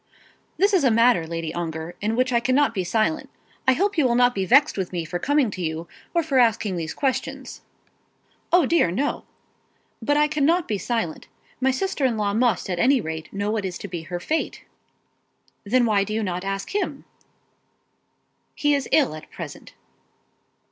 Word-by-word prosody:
"This 405 +2 +3
is 365 -6 +4
a 260 - +5
matter, 230 -7 +4
Lady 165 -1 -4
Ongar, 165 0 -4
in 215 +2 0
which 255 +1 +1
I 235 - +4
cannot 255 +1 +2
be 190 -4 -1
silent. 220 - 0 0.4
I 260 - +6
hope 390 +4 0
you 290 - +4
will 235 - +1
not 245 0 +4
be 195 -3 -2
angry 285 +3 +6
with 190 -3 -3
me 175 -3 -3
for 175 +3 -4
coming 285 0 +2
to 185 - -6
you, 160 0 -3 0.3
or 335 - +3
for 280 -4 +1
asking 225 -4 +2
you - - -3
these 160 -1 -5
questions 270 -3 -3 0.4
" - - -40
"O 350 -3 +5
dear, 330 - +3
no." 270 +12 -2 0.8
"But 290 0 +1
I 300 0 +4
cannot 310 +4 +1
be 210 -3 -1
silent. 225 -10 -3 0.3
My 265 0 +2
sister 300 +2 -1
in 245 -4 +2
law 205 -1 0
must 230 -2 +1
at 180 -2 -2
any 265 +5 +4
rate 160 -4 -6
know 200 +1 -2
what 215 -2 -1
is 185 -2 -4
to - - -7
be 175 -3 -5
her 175 +2 -5
fate." 315 - -2 1.0
"Then 245 +4 +3
why 205 -3 +3
do 215 +1 -4
you 220 - 0
not 180 -2 -3
ask 195 - -4
him?" 410 - -2 1.5
"He 295 -1 +2
is 280 -1 -1
ill 285 - +3
at 155 - -10
present." - - -9
225 Hz, 195 wpm, -23 LUFS, 180-280 Hz, 1.5 s, I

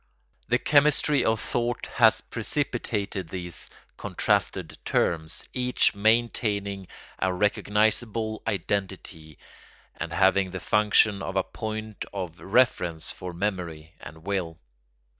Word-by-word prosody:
The 120 +3 +3
chemistry 145 0 +3
of 110 0 +2
thought 120 +1 -1
has 115 -4 +5
precipitated 110 - -2
these 90 -2 -5 0.3
contrasted - - 0
terms, 80 -1 0
each 125 -3 +2
maintaining 100 -3 +1 0.3
a 95 - +1
recognisable 110 +3 +1
identity 95 -6 -3 0.6
and 85 - -5
having 95 +2 +3
the 95 +1 -5
function 105 -1 +3
of 95 0 -4
a 95 - +2
point 110 0 -5
of 90 -4 -5
reference 95 -7 +1
for 90 -1 -7
memory 85 -4 -4
and 80 +4 -12
will. 90 -5 -2
100 Hz, 105 wpm, -26 LUFS, 90-110 Hz, 0.6 s, has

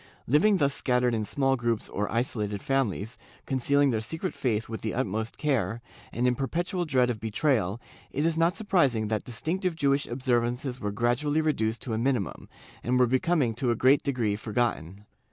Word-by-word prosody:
Living 180 - +4
thus 140 -4 +2
scat 125 -3 0
tered 125 -1 +2
in 110 -1 0
small 135 +5 +1
groups 120 -3 -1
or 105 +1 -3
isolated 105 -4 -2
families, 115 -4 -1 0.3
concealing 140 +1 +2
their 110 -2 0
secret 160 - -3
faith 110 -4 -1
with 110 0 -6
the 110 - -3
utmost 110 -2 -2
care, 120 -8 0 0.3
and 120 +2 -1
in 125 - +3
perpetual 175 - -2
dread 130 -5 +2
of 110 - -5
betrayal, 110 - 0 0.3
it 145 +3 -1
is 165 -1 +2
not 165 +2 +2
surprising 140 - +1
that 110 -1 -1
distinctive 170 +8 -2
Jewish 140 -2 +1
observances 125 +1 -1
were 105 - -2
gradually 120 +8 +1
reduced 115 -8 0
to 120 - -4
a 110 - -1
minimum, 120 -6 -1 0.3
and 125 +1 +1
were 125 - +5
becoming 130 0 +1
to 120 +2 -1
a 120 - +2
great 130 +5 +4
degree 120 -7 0
forgotten. 105 -4 -2
125 Hz, 180 wpm, -27 LUFS, 110-140 Hz, 0.3 s, were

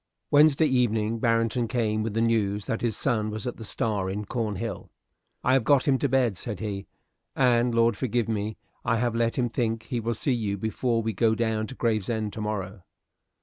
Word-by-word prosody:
Wednesday 150 +1 +6
evening 115 -5 +1
Barrington 115 +1 +1
came 110 -2 0
with 110 -1 -3
the 115 - +2
news 105 -3 +1
that 115 - -2
his 115 -3 -1
son 110 -6 0
was 110 0 -5
at 125 - -4
the 115 - -8
"Star" 105 -3 -1
in 105 +2 -3
Cornhill. 110 -1 -3 0.5
"I 130 - +3
have 135 -3 +3
got 140 +3 +3
him 135 -2 +3
to 140 - +1
bed," 125 -6 +2
said 105 -2 -6
he, 100 -2 -4 0.5
"and, 120 -2 +3
Lord 115 -1 +4
forgive 120 0 -1
me, 110 -1 -2 0.3
I 115 -1 +1
have 120 0 0
let 115 0 0
him 125 -2 +2
think 115 -1 -1
he 125 -3 -3
will 115 +1 -2
see 130 +4 0
you 105 -4 -1
before 115 +3 -1
we 110 0 -1
go 110 +3 +2
down 110 -1 -1
to 130 - -9
Gravesend 110 -2 -1
to 110 - -5
morrow." 105 -2 -4
115 Hz, 200 wpm, -26 LUFS, 105-120 Hz, 0.5 s, Wednesday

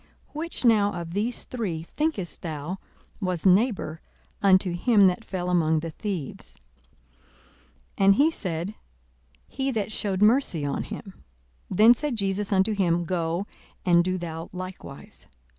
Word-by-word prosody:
42:010:036 - - -32
Which 330 -4 -4
now 210 -3 +4
of 170 -1 -6
these 220 +5 -2
three, 190 -10 -4
thinkest 250 - -2
thou, 160 +3 -5 0.4
was 185 -3 -2
neighbour 190 -4 +2 0.4
unto 190 -2 +4
him 205 +3 +4
that 185 +4 +2
fell 185 -4 -4
among 160 -3 +2
the 165 0 -5
thieves? 160 - -3 1.4
42:010:037 195 - +4
And 195 0 +7
he 295 +7 +4
said, 180 - -3 0.7
He 270 0 -2
that 215 -5 -2
shewed 200 -2 0
mercy 215 - +3
on 140 - -1
him. 195 -2 -9 0.5
Then 215 +5 +7
said 280 +1 -3
Jesus 200 0 -1
unto 195 +2 +3
him, 175 -4 +1
Go, 170 +1 -1 0.4
and 175 -1 +5
do 185 +1 -1
thou 165 -1 -6
likewise. 185 -6 -9
190 Hz, 140 wpm, -26 LUFS, 170-215 Hz, 1.4 s, And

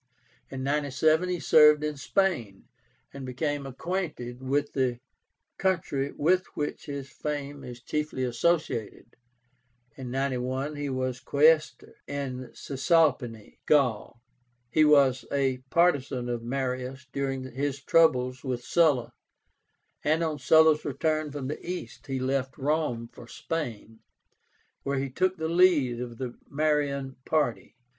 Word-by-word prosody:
In 130 -1 -5
97 150 +4 +2
he 180 -1 -1
served 150 -2 +6
in 150 0 -2
Spain, 135 - -1 0.5
and 140 0 -8
became 140 +2 -3
acquainted 135 -4 -4
with 140 +2 -1
the 125 -3 0 0.6
country 160 -7 0
with 180 +5 +1
which 150 - -4
his 140 -1 -6
fame 145 -2 -5
is 120 -1 -9
chiefly 150 -3 -2
associated. 125 -4 -1 0.8
In 130 -2 -7
91 130 +2 -2
he 145 -1 -3
was 130 -1 -2
Quaestor 150 +4 +2
in 130 -3 -4
Cisalpine 135 -6 0
Gaul. 125 -6 +2 0.5
He 155 - +4
was 140 -4 +5
a 135 -2 +1
partisan 140 -8 +2
of 120 -1 -2
Marius 130 +1 -3
during 135 -1 -2
his 140 +1 -2
troubles 130 -4 +3
with 125 -3 -3
Sulla, 150 -5 +2 0.9
and 155 +3 +2
on 155 -2 -2
Sulla's 160 -1 +5
return 155 +2 -1
from 140 -2 -5
the 150 - -5
East 180 -2 -6
he 135 -1 -2
left 130 0 -1
Rome 145 -5 -1
for 120 - -12
Spain, 115 -7 -5 0.8
where 140 0 -2
he 135 0 -2
took 185 +6 0
the 160 -1 -2
lead 165 -8 +3
of 120 -2 -6
the 125 -1 -6
Marian 140 -3 0
party. 150 -8 -1
140 Hz, 125 wpm, -27 LUFS, 130-155 Hz, 0.9 s, served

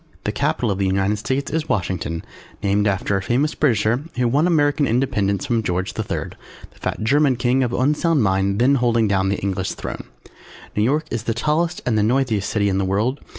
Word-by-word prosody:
The - - -1
Capitol 120 -4 0
of 95 - -2
the 95 - +1
United 95 +2 +1
States 130 +5 -2
is 160 -1 -2
Washington 85 -3 -2 0.4
named 100 +1 +2
after 100 0 0
a - - -2
famous 135 +9 0
Britisher 120 -1 +1
who 125 -1 +1
won 145 +8 +2
American 145 -3 +2
Independence 115 -3 0
from 120 -4 +1
George 90 -2 -2
the - - -3
III, - - -4 0.4
the - - -23
fat - - -3
German 140 +3 +3
King 125 +2 +1
of 125 -2 0
unsound 150 +3 +2
mind, 95 0 +1
then 125 +5 +4
holding 115 -2 +2
down 95 -1 +1
the 100 - 0
English 95 -1 -2
Throne. - - -6 0.7
New 105 - +1
York 145 +8 +1
is 115 0 -3
the 115 - -1
tallest 155 +7 0
and 110 -3 +1
the - - +3
noisiest 115 -2 +1
city 100 -2 +1
in 95 -1 +1
the - - +1
world. 105 +9 0
115 Hz, 205 wpm, -21 LUFS, 100-135 Hz, 0.7 s, then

